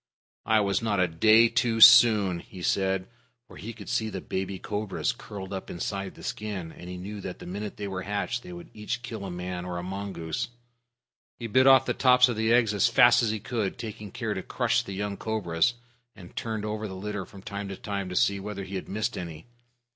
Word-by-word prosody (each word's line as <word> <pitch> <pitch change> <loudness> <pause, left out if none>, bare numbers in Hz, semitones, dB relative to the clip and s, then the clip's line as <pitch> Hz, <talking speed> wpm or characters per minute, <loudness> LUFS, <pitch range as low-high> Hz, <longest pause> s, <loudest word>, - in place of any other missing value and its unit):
"I 110 -1 +4
was 100 +1 +1
not 105 -3 0
a 90 - +4
day 110 +8 +5
too 115 -1 0
soon," 105 -5 +8
he 90 +1 -11
said, 95 0 +1 0.4
for - - -13
he 115 - -6
could 110 -3 -11
see 110 -1 0
the 95 -2 -5
baby 95 +1 -4
cobras 105 +1 -2
curled 95 -1 -8
up 95 - -6
inside 95 +3 -4
the - - -13
skin, 100 -6 -4
and 90 - -11
he 90 - -6
knew 100 +3 -7
that 90 -1 -6
the - - -11
minute 100 +3 -5
they 100 - -4
were 95 -1 -4
hatched 105 +5 -2
they - - -12
could 85 -1 -10
each 115 +3 -4
kill 110 -4 -6
a - - -5
man 90 0 -5
or 90 -1 -4
a 85 - -4
mongoose. 95 -4 -4 0.9
He 120 - -6
bit 130 +4 +4
off 130 -1 +7
the - - 0
tops 125 -1 +5
of 120 - -2
the 110 +1 +1
eggs 115 -3 +4
as 105 +3 +3
fast 120 +1 +6
as 115 - +1
he 110 0 -2
could, 110 -3 -3
taking 105 -2 -7
care - - -3
to - - -4
crush - - 0
the 100 - -8
young 100 +1 -3
cobras, 110 0 0 0.4
and 90 -3 -13
turned 110 -2 -3
over 110 0 -3
the 95 - -7
litter 105 +1 -4
from 95 0 -13
time 100 -1 -5
to 100 - -5
time 100 -2 -4
to 90 - -5
see 100 +2 +2
whether 100 0 -5
he 95 +1 -9
had 95 - -5
missed 110 +4 -2
any. 80 -3 -7
100 Hz, 225 wpm, -27 LUFS, 95-110 Hz, 0.9 s, soon